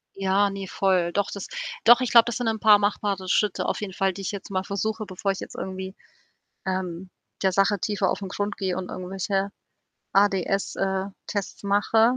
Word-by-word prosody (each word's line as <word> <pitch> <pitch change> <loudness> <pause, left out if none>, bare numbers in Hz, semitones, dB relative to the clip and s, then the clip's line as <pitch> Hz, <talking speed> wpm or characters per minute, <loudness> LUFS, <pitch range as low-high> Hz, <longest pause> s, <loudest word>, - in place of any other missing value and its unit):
Ja, 195 +1 +2
ne, 195 -1 -5
voll. 185 -3 +1
Doch, 200 -1 +1
das 200 - -6 0.4
doch, 240 +2 +7
ich 255 - -1
glaube, 235 -1 +8
das 240 -1 -2
sind 245 -2 -2
'n 220 -1 0
paar 210 -2 +7
machbare 200 -2 -1
Schritte 210 0 +1
auf - - -1
jeden 195 -2 -4
Fall, 190 0 +1
die 195 - -8
ich - - -2
jetzt 200 -2 -7
mal 190 -1 -1
versuche, 215 +2 -2
bevor 195 +1 -2
ich 195 - -5
jetzt - - -8
irgendwie, 190 0 -5 0.7
ähm, 185 -1 -3 0.3
der 190 - +4
Sache 195 +1 +2
tiefer 200 0 0
aufn 195 - -2
Grund 205 +1 -3
gehe 185 -2 -1
und 185 -1 -5
irgendwelche 195 +2 -2 0.6
ADS, 195 -1 +2
äh, 190 0 0 0.2
Tests 200 -2 -4
mache, 220 +4 +3
195 Hz, 190 wpm, -25 LUFS, 190-205 Hz, 0.7 s, glaube